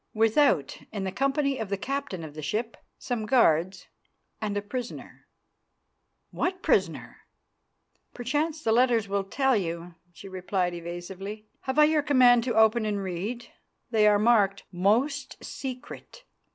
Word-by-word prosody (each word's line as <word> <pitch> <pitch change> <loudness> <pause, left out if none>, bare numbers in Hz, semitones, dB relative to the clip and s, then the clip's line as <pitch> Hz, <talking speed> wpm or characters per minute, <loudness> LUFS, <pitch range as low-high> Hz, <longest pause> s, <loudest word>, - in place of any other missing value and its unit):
"Without, 225 - +2
in 205 -3 -4
the 190 - -2
company 275 +4 0
of 220 -3 -4
the 200 - -1
captain 275 - -4
of 155 -2 -8
the 155 - -7
ship, 220 +10 -2 0.2
some 225 -3 -3
guards, 185 -6 +2 0.5
and 205 -1 -2
a - - 0
prisoner." 245 +3 -7 1.0
"What 370 +1 -2
prisoner?" - - 0 0.9
"Perchance 295 +6 -2
the 225 - +1
letters 235 -2 +3
will 200 0 -1
tell 265 +6 +1
you," 170 -3 -3 0.2
she 175 - -12
replied 185 -1 -2
evasively. 185 +5 -7 0.2
"Have 265 +1 -2
I 300 - +8
your 305 0 +4
command 250 -4 +5
to 240 -3 -1
open 220 +1 +4
and 205 -2 -2
read? 200 +7 -4 0.5
They 215 -2 +4
are 210 -1 +5
marked 205 -3 +3
'Most 240 +10 0
Secret. 265 - -8
220 Hz, 140 wpm, -27 LUFS, 190-255 Hz, 1.0 s, I